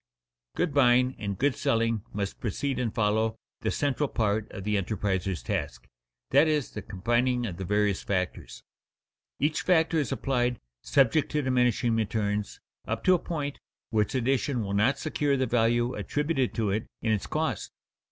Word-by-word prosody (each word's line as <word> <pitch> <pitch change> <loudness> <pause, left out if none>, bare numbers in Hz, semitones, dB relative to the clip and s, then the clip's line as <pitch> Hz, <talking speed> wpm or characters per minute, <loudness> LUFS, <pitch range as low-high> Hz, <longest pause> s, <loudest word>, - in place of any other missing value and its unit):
_ - - -19
Good 160 - 0
buying 125 -2 +4
and 100 -3 -3
good 145 0 +2
selling 115 -1 +1
must 100 -1 -4
precede 130 +5 -2
and 120 -3 0
follow 110 +1 +1 0.2
the - - -1
central 145 0 0
part 105 -1 0
of 95 - -7
the 105 +1 0
enterpriser's 95 - -1
task, - - -3 0.4
that 160 - +6
is, 150 -4 0
the 105 - -6
combining 120 +6 0
of 90 -6 -5
the 95 - -4
various 105 0 +1
factors. 90 -10 -3 0.8
Each 150 +2 +1
factor 165 -2 +3
is 140 -7 -1
applied, 125 -3 0 0.2
subject 140 - +3
to 150 -1 +1
diminishing 125 -3 +2
returns, 105 -2 -1 0.3
up - - -2
to 185 - +5
a 180 - +3
point 145 -5 -4 0.3
where 110 -2 +3
its 105 - -2
addition 130 0 +1
will 100 -1 -3
not 110 +7 +3
secure 145 -2 0
the 130 - +1
value 120 +1 +2
attributed 145 -4 -1
to 110 -3 0
it 105 +3 -2 0.2
in 110 - +1
its 105 -3 0
cost. - - -2
115 Hz, 170 wpm, -28 LUFS, 105-135 Hz, 0.8 s, that